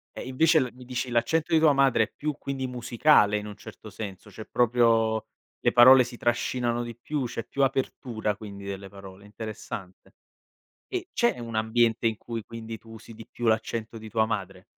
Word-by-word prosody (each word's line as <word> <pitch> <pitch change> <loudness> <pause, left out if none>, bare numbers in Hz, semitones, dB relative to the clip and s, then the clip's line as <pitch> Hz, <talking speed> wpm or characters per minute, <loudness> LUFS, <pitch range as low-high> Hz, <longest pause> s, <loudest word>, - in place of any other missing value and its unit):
E - - -6
invece 160 +5 +4
l 125 -2 -1
mi 125 -1 -13
dici 125 0 -3
l'accento 155 +8 +1
di 160 - +6
tua 155 -2 +5
madre 135 -4 +4
è - - -6
più 150 -1 -3
quindi 135 -1 -4
musicale 120 -3 +3
in 105 0 -5
un 105 - -8
certo - - -12
senso, 100 -1 -8
cioè, 110 +3 -10
proprio 115 -2 +2 0.3
le 120 - +2
parole 125 +1 +8
si 120 0 -9
trascinano 120 0 0
di 120 -1 -7
più, 140 +3 -3
c'è 115 -1 -4
più 140 +2 0
apertura 120 -5 -1
quindi 100 -2 -9
delle 100 0 -6
parole. 100 0 -12
Interessante. 105 -3 -8 0.8
E 370 -1 -3
c'è 235 - +1
un 115 -1 -6
ambiente 115 +1 +2
in 110 -2 +1
cui 115 -2 -6
quindi 115 0 -8
tu 115 +1 -16
usi 115 +1 -11
di 115 0 -11
più 120 - -7
l'accento 110 +1 -1
di 110 0 -9
tua 110 0 +2
madre? 95 -3 -4
115 Hz, 190 wpm, -27 LUFS, 110-125 Hz, 0.8 s, parole